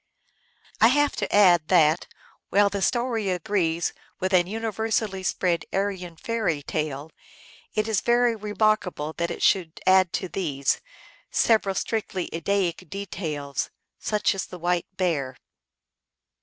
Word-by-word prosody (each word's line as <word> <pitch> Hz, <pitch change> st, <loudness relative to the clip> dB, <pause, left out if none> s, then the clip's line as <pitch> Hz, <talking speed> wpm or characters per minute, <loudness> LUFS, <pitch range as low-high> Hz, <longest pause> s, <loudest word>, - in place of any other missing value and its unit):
I 225 Hz, -, +7 dB
have 290 Hz, +3 st, +2 dB
to -, -, -2 dB
add 175 Hz, -6 st, +5 dB
that, 160 Hz, -2 st, +4 dB, 0.4 s
while 200 Hz, 0 st, +4 dB
the 200 Hz, -, -3 dB
story 235 Hz, -3 st, 0 dB
agrees 175 Hz, -2 st, 0 dB, 0.3 s
with 190 Hz, +1 st, -1 dB
an 175 Hz, -1 st, +4 dB
universally 220 Hz, -1 st, -2 dB
spread 180 Hz, -2 st, 0 dB
Aryan 190 Hz, -3 st, -2 dB
fairy 195 Hz, -9 st, -1 dB
tale, 150 Hz, 0 st, -3 dB, 0.6 s
it 215 Hz, 0 st, +1 dB
is 220 Hz, -4 st, +1 dB
very 240 Hz, 0 st, +3 dB
remark 215 Hz, -1 st, +1 dB
able 155 Hz, -3 st, -5 dB
that 170 Hz, 0 st, 0 dB
it -, -, -5 dB
should 175 Hz, -4 st, +2 dB
add 185 Hz, -2 st, +5 dB
to 185 Hz, -, -2 dB
these, 145 Hz, -8 st, -1 dB, 0.5 s
several 215 Hz, -4 st, +2 dB
strictly 195 Hz, -5 st, -2 dB
Ed 165 Hz, 0 st, -5 dB
daic 185 Hz, -4 st, 0 dB
details, 160 Hz, -8 st, -4 dB, 0.3 s
such 210 Hz, -1 st, +1 dB
as 195 Hz, -, -4 dB
the 180 Hz, -, -9 dB
white 175 Hz, 0 st, 0 dB
bear. 140 Hz, -9 st, -1 dB
185 Hz, 135 wpm, -25 LUFS, 170-210 Hz, 0.6 s, I